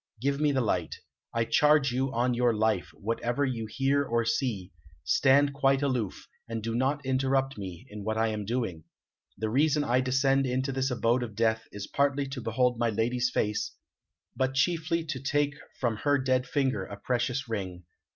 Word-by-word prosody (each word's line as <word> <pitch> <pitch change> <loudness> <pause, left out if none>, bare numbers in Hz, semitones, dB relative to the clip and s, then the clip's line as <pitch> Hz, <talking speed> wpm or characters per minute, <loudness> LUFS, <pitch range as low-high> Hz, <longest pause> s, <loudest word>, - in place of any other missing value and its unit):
Give 140 +3 0
me 150 -1 +3
the 135 -2 +1
light. 90 -8 -1 0.4
I 115 0 0
charge 150 -1 +4
you 130 +2 0
on 125 0 +1
your 120 -1 +2
life, 110 -4 +1
whatever 120 +5 -1
you 115 -4 -3
hear 135 +4 +1
or 115 -3 0
see, 115 -6 -1 0.3
stand 140 +1 +4
quite 135 0 +2
aloof, 125 -8 -2 0.2
and 115 -1 -4
do 115 0 -2
not 135 +4 0
interrupt 135 +1 +1
me 95 +1 -7
in 105 -4 -8
what 110 +1 -1
I 110 0 +2
am 105 -1 -3
doing. 105 -8 -3 0.5
The 110 -1 -2
reason 150 +3 +3
I 125 -2 +2
descend 135 +1 +2
into 130 +2 -1
this 130 0 0
abode 120 0 +1
of 115 -4 -5
death 110 0 +1
is 100 -1 -6
partly 140 +2 +1
to 135 -2 -5
behold 120 +1 +1
my 120 -1 +2
lady's 120 +3 0
face, 105 -3 -1 0.6
but 130 0 0
chiefly 165 +3 +1
to 155 -5 -4
take 145 +1 +1 0.3
from 115 -4 0
her 145 +4 +2
dead 130 -1 +1
finger 130 -8 0
a 100 +2 -8
precious 120 +4 -1
ring. 95 -5 -4
125 Hz, 180 wpm, -28 LUFS, 110-135 Hz, 0.6 s, charge